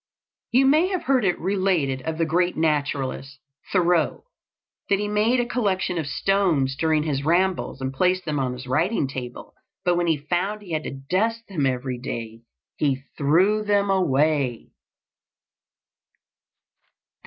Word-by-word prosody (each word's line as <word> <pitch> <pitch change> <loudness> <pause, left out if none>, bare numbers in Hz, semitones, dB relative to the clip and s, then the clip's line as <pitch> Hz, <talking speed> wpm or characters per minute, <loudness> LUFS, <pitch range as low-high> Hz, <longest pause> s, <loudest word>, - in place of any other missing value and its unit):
You 260 +3 +4
may 305 +6 +4
have 370 -2 -2
heard 260 -2 +2
it 180 -3 +1
related 180 -8 0
of 160 +3 -4
the 165 - +1
great 175 +3 +1
naturalist, 140 -3 -1 0.3
Thoreau, 175 -3 +2 0.7
that 200 - +4
he 205 +1 -2
made 215 +4 +2
a 240 - +1
collection 195 -7 -1
of 155 - -3
stones 160 -6 +1
during 155 +1 +1
his 140 -3 -2
rambles, 175 -2 0
and 130 0 -3
placed 185 +5 +1
them 150 -3 -1
on 130 -2 -1
his 125 +1 -8
writing 155 - +1
table; 125 -2 -7 0.3
but 175 -1 +3
when 175 0 +1
he 160 -2 +2
found 180 +8 -2
he 180 - -11
had 155 -1 -2
to - - -4 0.2
dust 225 +6 0
them 150 -8 0
every 125 -1 -2
day, 115 -3 -6 0.4
he 135 -2 0
threw 185 +9 +3
them 200 -1 +2
away. 145 - +1
165 Hz, 150 wpm, -24 LUFS, 140-195 Hz, 0.7 s, You